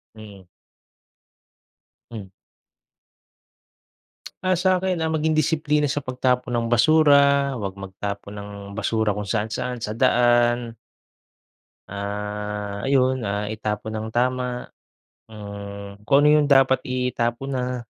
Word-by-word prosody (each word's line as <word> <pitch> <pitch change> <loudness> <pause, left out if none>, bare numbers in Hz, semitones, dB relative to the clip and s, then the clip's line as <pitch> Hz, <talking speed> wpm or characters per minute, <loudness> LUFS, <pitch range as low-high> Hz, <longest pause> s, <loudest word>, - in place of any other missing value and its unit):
Mhm. 100 -4 -13 1.6
Hmm. 105 -5 -8 2.1
Ah, 185 -1 +2
sa’kin, 185 0 +1
ah, 160 - 0
maging 155 0 0
disiplina 155 -1 +1
sa 145 +1 0
pagtapon 125 -1 -1
ng 115 - 0
basura, 140 0 +5
huwag 95 -1 -5
magtapon 100 +1 -6
ng 100 0 -9 0.2
basura 110 0 0
kung 105 0 -5
saan-saan, 115 +3 -2
sa 105 - -3
daan 120 -1 +2 1.2
ah, 105 0 -5
ayun, 130 -1 +2
ah, 105 +1 -2
itapon 110 0 -4
ng 110 +1 -4
tama, 125 0 -1 0.6
hmm, 100 -1 -9
kung 140 +6 +4
ano - - +6
yung 145 - 0
dapat 135 -1 +5
itapon 125 0 -2
na 125 -1 -3
120 Hz, 105 wpm, -23 LUFS, 105-135 Hz, 2.1 s, ano